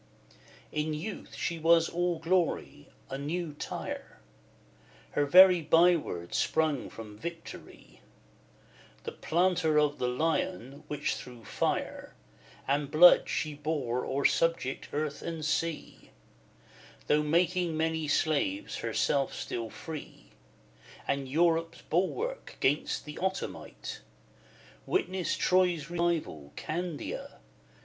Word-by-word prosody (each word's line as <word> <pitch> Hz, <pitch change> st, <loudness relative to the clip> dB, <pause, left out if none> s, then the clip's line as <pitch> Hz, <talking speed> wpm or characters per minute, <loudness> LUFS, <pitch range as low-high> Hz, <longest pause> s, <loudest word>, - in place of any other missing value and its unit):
XIV. -, -, -29 dB, 0.4 s
In 155 Hz, 0 st, -1 dB
youth 185 Hz, +7 st, -6 dB
she 170 Hz, -1 st, -2 dB
was 165 Hz, +1 st, +5 dB
all 175 Hz, 0 st, 0 dB
glory, 175 Hz, +1 st, -1 dB, 0.2 s
a 135 Hz, -, -3 dB
new 160 Hz, +2 st, -3 dB
Tyre, 145 Hz, -, -6 dB, 0.9 s
Her 145 Hz, 0 st, +1 dB
very 180 Hz, +2 st, +8 dB
byword 160 Hz, -, +2 dB
sprung 155 Hz, -5 st, +1 dB
from 105 Hz, -2 st, -10 dB
victory, 170 Hz, +4 st, -9 dB, 1.0 s
The -, -, -4 dB
'Planter 175 Hz, -2 st, +1 dB
of 150 Hz, -1 st, +1 dB
the 125 Hz, -, 0 dB
Lion,' 150 Hz, 0 st, -1 dB
which 150 Hz, 0 st, -1 dB
through 120 Hz, -3 st, -9 dB
fire -, -, -2 dB, 0.5 s
And 140 Hz, +1 st, 0 dB
blood 175 Hz, +3 st, +7 dB
she 155 Hz, -1 st, -1 dB
bore 145 Hz, -5 st, -2 dB
o'er 140 Hz, +1 st, -1 dB
subject 165 Hz, -5 st, +1 dB
earth 150 Hz, 0 st, -2 dB
and 165 Hz, -2 st, -4 dB
sea; 165 Hz, +1 st, -2 dB, 1.0 s
Though 150 Hz, 0 st, +3 dB
making 170 Hz, +2 st, +1 dB
many 160 Hz, -1 st, 0 dB
slaves, 160 Hz, -, 0 dB
herself 140 Hz, -2 st, 0 dB
still 115 Hz, -2 st, -4 dB
free 155 Hz, +5 st, -9 dB, 0.8 s
And 140 Hz, -1 st, -1 dB
Europe's 165 Hz, +2 st, +1 dB
bulwark 405 Hz, -, -2 dB
'gainst 145 Hz, +3 st, 0 dB
the 150 Hz, -, -8 dB
Ottomite: 190 Hz, +1 st, -4 dB, 0.9 s
Witness 190 Hz, -, 0 dB
Troy's 180 Hz, -4 st, +2 dB
rival, 165 Hz, -, -1 dB
Candia! 170 Hz, -1 st, -5 dB
160 Hz, 110 wpm, -30 LUFS, 145-175 Hz, 1.0 s, very